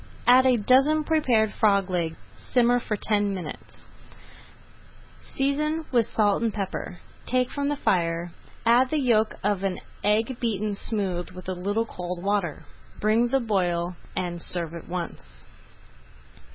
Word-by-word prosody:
Add 255 +1 +7
a 250 -2 +4
dozen 270 +8 +4
prepared 250 -9 +2
frog 200 -3 +3
legs 170 -3 -1 0.2
simmer 245 0 +2
for 215 -3 -3
ten 205 -2 +1
minutes, 175 -5 -9 1.5
season 300 +4 0
with 235 -4 +3
salt 205 -1 +2
and 230 -1 +1
pepper, 195 -3 -5 0.3
take 255 0 +1
from 285 0 -1
the 290 - 0
fire, 170 -7 0 0.3
add 245 +3 +5
the 310 - 0
yolk 225 -5 +2
of 200 -1 0
an 195 -2 -1 0.3
egg 220 +4 +1
beaten 215 -3 -1
smooth 195 -4 -3
with 185 0 -11
a 185 - -1
little 200 +5 -1
cold 180 -4 -6
water; 195 -6 -1 0.3
bring 225 +3 +2
to 270 - +3
the 250 - -3
boil 175 -4 0 0.2
and 175 -2 -3
serve 170 -2 -3
at 170 - -9
once. 175 -1 -6
210 Hz, 145 wpm, -25 LUFS, 180-245 Hz, 1.5 s, Add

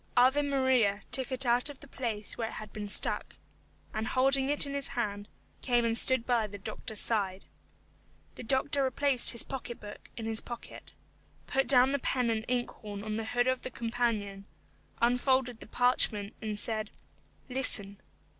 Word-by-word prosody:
Ave 260 +4 +5
Maria 260 -7 +1
took 260 +1 0
it 260 +1 +1
out 245 +3 +4
of 285 - -10
the 280 - -12
place 225 -6 -4
where 230 - -3
it - - -10
had 215 -1 -9
been 210 -1 -5
stuck, 200 - +2 0.6
and 220 +1 -3
holding 270 +1 +2
it 290 0 +5
in 280 - -5
his 280 -1 0
hand, 205 -3 -4 0.3
came 240 -2 +1
and 225 0 0
stood 260 0 +6
by 235 -3 +1
the 205 0 -9
doctor's 205 +2 -2
side. 195 -4 0 0.9
The - - -9
doctor 270 +3 0
replaced 265 0 +2
his 235 - +2
pocket 250 -3 -7
book 205 - -11
in 225 - -5
his 225 0 -1
pocket, 240 -1 -10 0.5
put 270 -1 0
down 260 0 +6
the 280 - 0
pen 250 -2 0
and 220 0 -2
inkhorn 215 -5 -4
on 215 0 -4
the 225 - -3
hood 245 +2 0
of 255 0 0
the - - -6
companion, 225 -5 -2 0.6
unfolded 250 0 +2
the - - -11
parchment, 220 -4 +1
and 215 -2 -4
said, 215 -1 -2 0.6
"Listen." 205 -6 +1
240 Hz, 175 wpm, -30 LUFS, 215-260 Hz, 0.9 s, stood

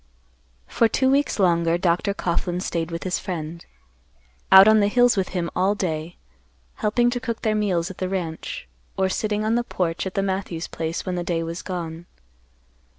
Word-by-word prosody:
For 230 - +2
two 260 +4 +2
weeks 280 +1 +1
longer, 170 -3 +2
Dr. 180 +3 +1
Coughlan 175 0 -1
staid 165 -2 -2
with 165 0 -5
his 185 -1 -1
friend; 170 -3 -5 0.9
out 190 +1 +10
on 215 0 +6
the 205 - +3
hills 245 +3 +4
with 190 -2 -1
him 175 -2 -3
all 190 +3 +2
day, 165 -3 -3 0.6
helping 240 +3 +2
to 245 - -2
cook 235 -2 -4
their 220 - +2
meals 190 -4 0
at 190 - -12
the 185 - -2
ranch, 165 - -4 0.3
or 190 0 +2
sitting 210 +2 -1
on 220 - +1
the 240 +1 +1
porch 175 -5 -2
at 185 - -7
the 195 - +1
Matthews 190 -3 -3
place 165 +1 -4
when 185 - -2
the 175 -1 -2
day 170 -1 -1
was 165 +1 -5
gone. 170 -2 -6
185 Hz, 185 wpm, -23 LUFS, 170-210 Hz, 0.9 s, out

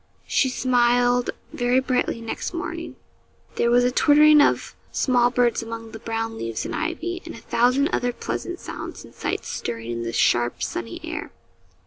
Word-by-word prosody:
She 265 - +2
smiled 245 -1 +2 0.2
very 245 +1 +2
brightly 255 -3 0
next 230 +9 -4
morning. 335 0 -5 0.6
There 235 - +2
was 245 +1 +5
a 250 - +2
twittering 300 +2 +6
of - - +1 0.2
small 245 -2 +3
birds 245 -1 +2
among 225 0 -7
the 220 - -8
brown 225 0 -3
leaves 115 -1 -3
and - - -4
ivy, 340 +3 -3
and - - -8
a - - -9
thousand 255 +4 +2
other 245 -7 0
pleasant 120 - -5
sounds - - -7
and - - -16
sights - - -3
stirring 115 0 -4
in 115 0 -3
the 115 0 -3
sharp, 120 +1 +2
sunny 115 -1 -4
air. - - -5
245 Hz, 165 wpm, -23 LUFS, 225-260 Hz, 0.6 s, twittering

